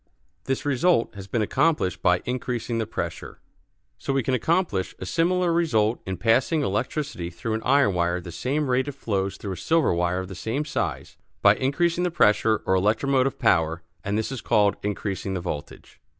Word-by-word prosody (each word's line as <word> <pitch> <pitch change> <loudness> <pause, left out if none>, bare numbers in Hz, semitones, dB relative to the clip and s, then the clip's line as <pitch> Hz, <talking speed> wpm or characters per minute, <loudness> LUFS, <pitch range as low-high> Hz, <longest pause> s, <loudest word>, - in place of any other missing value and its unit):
This 135 +1 -2
result 145 -1 +2
has 100 -1 -9
been 110 +2 0
accomplished 115 - +1
by 90 0 +2
increasing 125 -2 -2
the 110 - -2
pressure. - - -5 0.6
So, 135 - -2
we 135 -1 +1
can 130 - -1
accomplish 160 - 0
a - - -6
similar 175 - +1
result 120 -10 +1
in 95 -1 -3
passing 130 - +2
electricity 105 - -2
through 100 +6 -4
an 110 - -2
iron 140 -5 +3
wire 85 0 +1
at 90 - -5
the 85 - -8
same 135 - -1
rate 130 +2 +1
it 145 - -4
flows 100 -7 -2
through 100 - -6
a - - -7
silver 160 - +2
wire 85 +1 0
of 95 0 -3
the 95 - -8
same 115 - -3
size, 155 - -3 0.3
by - - +8
increasing 170 +6 0
the 180 - +1
pressure, 110 -7 +3
or - - +2
electromotive 130 +8 +2
power; 80 - +2 0.2
and 100 +1 -1
this 110 +4 -2
is 130 - -5
called 105 -1 +3
increasing 100 -2 -3
the - - -1
voltage. 85 -4 -7
115 Hz, 190 wpm, -25 LUFS, 95-140 Hz, 0.6 s, by